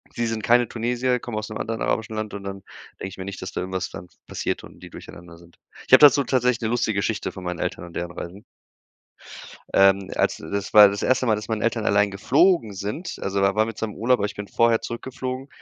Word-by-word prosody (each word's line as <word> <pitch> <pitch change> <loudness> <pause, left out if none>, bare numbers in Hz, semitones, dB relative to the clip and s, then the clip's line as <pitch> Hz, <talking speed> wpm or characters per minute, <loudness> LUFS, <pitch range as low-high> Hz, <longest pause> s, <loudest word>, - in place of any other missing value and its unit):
sie 120 - -1
sind 110 -1 -3
keine 120 0 +4
Tunesier, 125 +2 -1
kommen 115 -3 -6
aus 105 0 -4
'nem 105 - -5
anderen 115 0 -4
arabischen 110 0 -1
Land 110 -1 -4
und 100 -1 -6
dann 100 -1 -7 0.4
denke - - -4
ich 95 - -12
mir 95 - -6
nicht, 100 -1 -7
dass 95 - -6
da - - -4
irgendwas 95 0 -3
dann 85 +1 -9 0.2
passiert - - -3
und - - -14
die - - -10
durcheinander 85 -1 -12
sind. 85 0 -19 0.3
Ich - - -1
habe - - +10
dazu 145 -1 +7
tatsächlich 125 -2 +1
'ne 110 - -1
lustige 115 -4 0
Geschichte 110 +1 -2
von 95 - -10
meinen 90 -2 -4
Eltern - - -3
und 85 - -13
deren 85 0 -4
Reisen. 90 +4 -8 1.3
Ähm, 95 0 +4
als - - +1
das 100 +5 -5
war 105 -1 +9
das 100 0 -4
1. 130 0 +2
Mal, 110 -3 +3
dass 105 - -7
meine 110 -2 -2
Eltern 115 -1 0
allein 100 0 +3
geflogen 135 - +2
sind, 105 - -5
also 100 0 -1
da 100 +1 +2
waren 110 +1 +2
wir 115 - -6
zusammen 110 -1 -4
im - - -13
Urlaub, 125 0 +3
aber 100 - 0
ich 105 0 -6
bin 105 0 -6
vorher 115 -1 +3
zurückgeflogen, 130 +2 -5
105 Hz, 240 wpm, -23 LUFS, 95-120 Hz, 1.3 s, habe